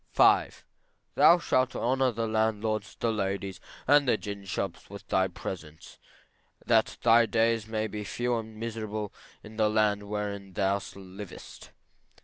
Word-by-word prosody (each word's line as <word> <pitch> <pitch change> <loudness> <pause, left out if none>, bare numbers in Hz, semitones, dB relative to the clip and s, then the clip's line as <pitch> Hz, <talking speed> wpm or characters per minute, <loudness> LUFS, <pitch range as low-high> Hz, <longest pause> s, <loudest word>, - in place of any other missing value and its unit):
V. - - +5 0.7
Thou 175 - +7
shalt 130 -6 +1
honor 130 +1 +1
the 115 0 -2
landlords, 110 -1 -1
the 115 - +1
landladies, 100 -3 -3 0.3
and 145 0 +5
the - - +3
gin 100 -2 -7
shops 95 -2 -4
with 100 0 -10
thy 95 0 +3
presence, 80 -5 -8 0.7
that - - +2
thy 115 0 +6
days 115 -1 +1
may 110 -1 -1
be 105 0 -5
few 120 +4 -1
and 110 -1 -5
miserable, 110 -2 -4 0.3
in 110 +1 -12
the 110 -1 +3
land 105 -1 +1
wherein 100 -2 -4
thou 100 +1 +1
livest. 95 0 -10
110 Hz, 140 wpm, -28 LUFS, 100-115 Hz, 0.7 s, Thou